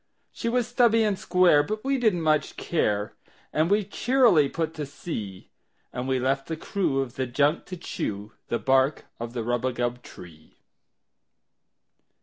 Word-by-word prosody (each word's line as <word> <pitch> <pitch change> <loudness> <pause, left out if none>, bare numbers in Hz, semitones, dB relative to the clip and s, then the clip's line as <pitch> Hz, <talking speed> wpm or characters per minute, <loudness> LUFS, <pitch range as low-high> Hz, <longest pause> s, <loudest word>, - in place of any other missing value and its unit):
She 230 - -3
was 245 0 +1
stubby 230 -3 +3
and 210 -2 +1
square, 180 -4 +4
but 215 - -4
we 275 -1 +1
didn't 210 -8 +2
much 155 -1 +1
care, 105 -10 -1 0.4
And 155 +2 +2
we 205 +1 +3
cheerily 225 - +3
put 160 +1 -3
to 155 -2 -4
sea; 105 - -7 0.4
And 125 +1 -4
we 130 -1 +1
left 135 +2 0
the 160 - -4
crew 160 -6 -1
of 130 -1 -6
the 130 -1 -1
junk 145 +6 +1
to 185 - -7
chew 105 -9 -5
The 120 - 0
bark 135 +3 +2
of 115 0 -6
the 120 -2 -3
rubagub 120 0 -1
tree. 80 -8 -14
145 Hz, 155 wpm, -26 LUFS, 125-185 Hz, 0.4 s, square